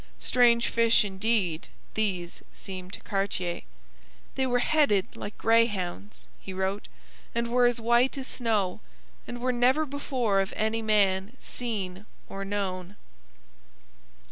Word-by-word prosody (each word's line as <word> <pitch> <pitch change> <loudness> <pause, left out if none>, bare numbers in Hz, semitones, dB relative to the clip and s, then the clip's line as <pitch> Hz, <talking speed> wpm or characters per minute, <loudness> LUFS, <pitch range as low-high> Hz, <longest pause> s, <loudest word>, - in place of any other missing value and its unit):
Strange 235 -1 +4
fish, 230 -2 +4
indeed, 190 -4 0 0.3
these 185 -5 -2
seemed 185 -1 -7
to - - -5
Cartier. 195 -3 -2 0.7
'They 265 -1 0
were 245 -1 +2
headed 245 -8 +2
like 205 - -7
greyhounds,' 210 -4 +1
he 190 - -8
wrote, 190 +2 -2 0.5
'and 235 0 0
were 245 0 +4
as 240 0 +1
white 240 +4 +3
as 265 - -4
snow, 220 -8 0 0.5
and 245 - -6
were 250 +1 0
never 255 +6 +3
before 260 -7 0
of 195 - -4
any 220 +1 0
man 205 0 +2
seen 205 -5 -4 0.2
or 195 0 -5
known.' 195 -2 -3
215 Hz, 125 wpm, -28 LUFS, 190-240 Hz, 0.7 s, Strange